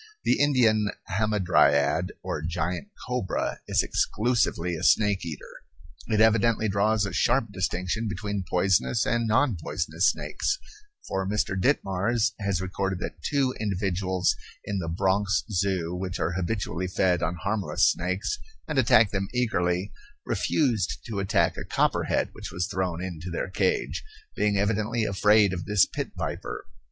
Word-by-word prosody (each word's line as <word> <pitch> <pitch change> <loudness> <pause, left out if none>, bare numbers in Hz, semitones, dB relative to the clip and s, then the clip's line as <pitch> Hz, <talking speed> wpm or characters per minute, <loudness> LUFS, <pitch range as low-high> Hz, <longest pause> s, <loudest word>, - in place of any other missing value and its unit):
The - - +2
Indian 115 -7 +3 0.3
hamadryad, 95 -9 +2
or - - -3
giant 85 0 -2 0.2
cobra, - - -2
is - - +2
exclusively 105 -7 0
a - - -6
snake 105 -3 +3
eater. 80 -4 -8 0.5
It 110 -2 +1
evidently 110 0 +4
draws 105 +1 +2
a 100 - -5
sharp 115 -5 +2
distinction 95 +3 -2
between 105 -1 -3
poisonous 90 -9 +2
and 120 -1 +1
non 120 -1 +2
poisonous 85 +3 +1
snakes, - - -2 0.5
for 95 0 -2
Mr. 105 -2 0
Ditmars 110 +1 +1
has 100 -3 -1
recorded 95 0 -2
that 80 -2 -6
two 135 - +1
individuals 95 -2 0 0.3
in 100 -1 -2
the 85 - -4
Bronx 95 +3 +1
Zoo 90 -3 0
which 90 0 -4
are 85 - 0
habitually 90 -1 -2
fed 90 -1 +1
on 85 0 -1
harmless 95 -2 +1
snakes, 95 +5 -2 0.3
and 150 -3 0
attack 110 -4 +5
them 95 -1 -1
eagerly, 95 -6 0 0.3
refused 115 - 0
to 110 -4 -4
attack 95 -1 +1
a - - -4
copperhead - - +1
which - - -8
was 90 0 -1
thrown 90 -2 -2
into 90 -1 -6
their 90 +2 -3
cage, 410 - 0 0.3
being 105 -1 +1
evidently 110 +3 0
afraid 105 0 +4
of 90 -1 -4
this 105 -2 +4
pit - - -4
viper. - - -4
100 Hz, 145 wpm, -26 LUFS, 90-110 Hz, 0.5 s, attack